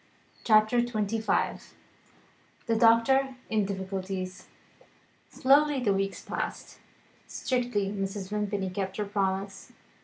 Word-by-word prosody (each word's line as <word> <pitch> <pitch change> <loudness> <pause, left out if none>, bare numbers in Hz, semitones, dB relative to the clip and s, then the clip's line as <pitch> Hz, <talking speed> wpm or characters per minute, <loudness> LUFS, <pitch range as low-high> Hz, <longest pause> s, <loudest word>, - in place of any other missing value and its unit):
CHAPTER 215 +2 +4
XXV 220 -2 -1 0.9
THE 230 - +1
DOCTOR 240 +4 +4 0.2
IN 215 -2 +2
DIFFICULTIES 190 -1 -5 0.8
SLOWLY 285 +1 +3
the 210 -5 +2
weeks 195 0 -2
passed. - - -5 0.5
Strictly 245 -6 -1
Mrs. 195 -1 -4
Vimpany 205 -2 -2
kept 190 0 -4
her 210 - -1
promise. 195 -1 -3
205 Hz, 95 wpm, -28 LUFS, 195-230 Hz, 0.9 s, CHAPTER